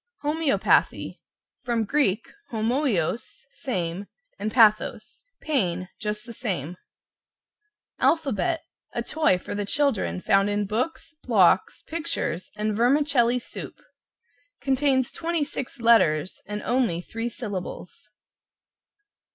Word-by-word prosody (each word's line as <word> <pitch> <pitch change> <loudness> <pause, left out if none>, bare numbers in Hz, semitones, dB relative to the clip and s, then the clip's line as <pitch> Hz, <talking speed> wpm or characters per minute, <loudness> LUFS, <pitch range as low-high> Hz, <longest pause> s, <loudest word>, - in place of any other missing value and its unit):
=HOMOEOPATHY= 300 -1 +1 0.4
From 235 -2 0
Grk. 230 -4 +2 0.3
homoios, 230 - -1
same, 185 -6 -3 0.3
and 215 - -2
pathos. 220 - +3 0.2
Pain, 185 - -1
just 210 0 -3
the 235 - -9
same. 180 - -3 1.2
=ALPHABET= 325 - +1 0.3
A - - -2
toy 310 -12 +2
for - - -7
the 205 0 -2
children 205 - 0
found 195 - +3
in 205 0 0
books, 250 +12 -2
blocks, 190 -6 +3
pictures 320 - -3
and 210 0 -1
vermicelli 250 0 +3
soup. 245 - -8 0.8
Contains 265 -1 +1
26 305 -6 -3
letters 185 -8 +3
and 210 +1 -4
only 240 -9 +1
three 225 +5 -4
syllables. 205 -3 -7
230 Hz, 100 wpm, -25 LUFS, 200-275 Hz, 1.2 s, pathos